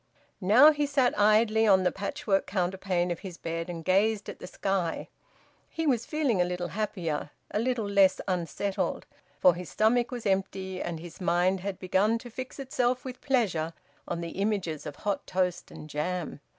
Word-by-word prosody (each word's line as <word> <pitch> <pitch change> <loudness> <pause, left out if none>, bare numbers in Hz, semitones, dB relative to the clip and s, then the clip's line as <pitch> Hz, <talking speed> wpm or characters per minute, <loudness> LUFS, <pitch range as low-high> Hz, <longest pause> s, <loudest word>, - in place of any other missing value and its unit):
Now 235 +11 +7
he 295 -1 0
sat 275 -3 +2
idly 215 +1 +4
on 190 -2 +5
the 180 - +2
patchwork 200 - -1
counterpane 185 -1 -1
of 170 - -3
his 180 -3 -8
bed 165 +1 -4
and 165 -2 -6
gazed 205 +3 +2
at - - -8
the - - -8
sky. 190 -3 -2 0.6
He 325 - -3
was 245 -6 +1
feeling 280 - +1
a - - +5
little 180 0 -3
happier, 175 -6 -3 0.2
a - - 0
little 235 -2 0
less 195 -2 +4
unsettled, 185 +2 -2 0.3
for 180 - +6
his 175 +1 -7
stomach 235 +2 +2
was 245 -3 -6
empty 190 -1 -1
and 165 -2 -4
his 170 +2 -11
mind 180 +2 +2
had 195 0 -4
begun 195 +4 +2
to 240 +1 -11
fix 255 +3 -7
itself 255 -2 -1
with 255 -1 -7
pleasure 190 - 0 0.3
on 170 0 -3
the 170 - -4
images 195 -5 -2
of 145 - -6
hot 205 -2 -3
toast 180 -1 -1
and 155 - -10
jam. 160 +2 -3
195 Hz, 175 wpm, -28 LUFS, 175-225 Hz, 0.6 s, Now